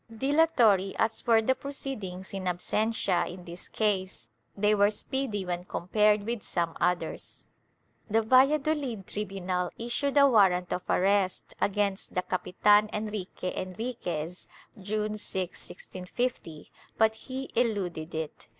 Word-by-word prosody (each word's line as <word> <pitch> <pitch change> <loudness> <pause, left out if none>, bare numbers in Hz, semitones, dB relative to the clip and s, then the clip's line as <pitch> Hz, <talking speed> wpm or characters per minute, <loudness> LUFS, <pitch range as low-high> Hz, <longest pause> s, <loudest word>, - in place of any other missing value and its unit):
Dilatory 230 - +3
as 225 +1 0
were 225 -1 +5
the 260 - +3
proceedings 220 -11 -6
in 195 -1 -4
absentia 185 +1 0
in 180 0 -10
this 175 +1 -7
case, 195 -3 -1 0.3
they 210 +1 +3
were 205 0 +4
speedy 215 -2 -2
when 175 0 -3
compared 210 +4 +2
with 230 0 -3
some 170 -4 -2
others. 180 0 -2 0.6
The 225 +2 +3
Valladolid 270 -2 +3
tribunal 185 -3 -3
issued 265 +5 -1
a 280 0 +8
warrant 190 -7 +4
of 180 - -2
arrest 195 0 +1
against 200 -1 0
the 180 - +1
Capitan 205 +3 +3
Enrique 210 -4 -4
Enriquez, 180 -5 -4 0.3
June 210 +2 -2
6, 185 -3 -4
1650, 180 -4 -5 0.3
but 220 0 +4
he 260 +4 -7
eluded 185 -9 -1
it. 160 -1 -5
205 Hz, 125 wpm, -28 LUFS, 180-225 Hz, 0.6 s, a